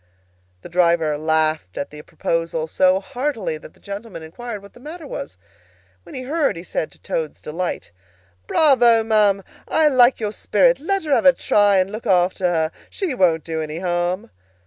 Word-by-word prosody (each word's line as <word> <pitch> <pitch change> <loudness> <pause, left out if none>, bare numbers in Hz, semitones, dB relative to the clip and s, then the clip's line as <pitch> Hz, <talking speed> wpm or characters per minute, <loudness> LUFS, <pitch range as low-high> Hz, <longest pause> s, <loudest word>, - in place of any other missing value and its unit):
The - - -9
driver 170 -3 +2
laughed 155 - 0
at 140 - -4
the 150 0 -9
proposal, 165 0 -2
so 185 +3 +3
heartily 295 - -3
that - - -14
the - - -24
gentleman 200 -4 -8
inquired 210 +6 -7
what 200 - -15
the - - -16
matter 310 +5 -9
was. 95 - -7 0.6
When - - -13
he 255 - -5
heard, 285 - 0
he 170 - -7
said, 160 - -3
to - - -21
Toad's 155 -2 -4
delight, 170 - -4 0.6
"Bravo, 240 -7 +5
ma'am! 210 -3 +2 0.2
I 315 -1 +3
like 255 -2 +4
your 210 -2 -2
spirit. - - +2
Let 390 +4 -1
her 300 -3 0
have 280 - +4
a 275 - +8
try, 205 -4 +3
and 190 +1 +1
look 220 +2 -6
after 185 -1 +2
her. 165 -2 +1 0.2
She 375 -8 -3
won't 170 -8 +2
do 160 -1 -3
any 155 0 -5
harm." 175 +1 -2
195 Hz, 180 wpm, -21 LUFS, 165-250 Hz, 0.6 s, a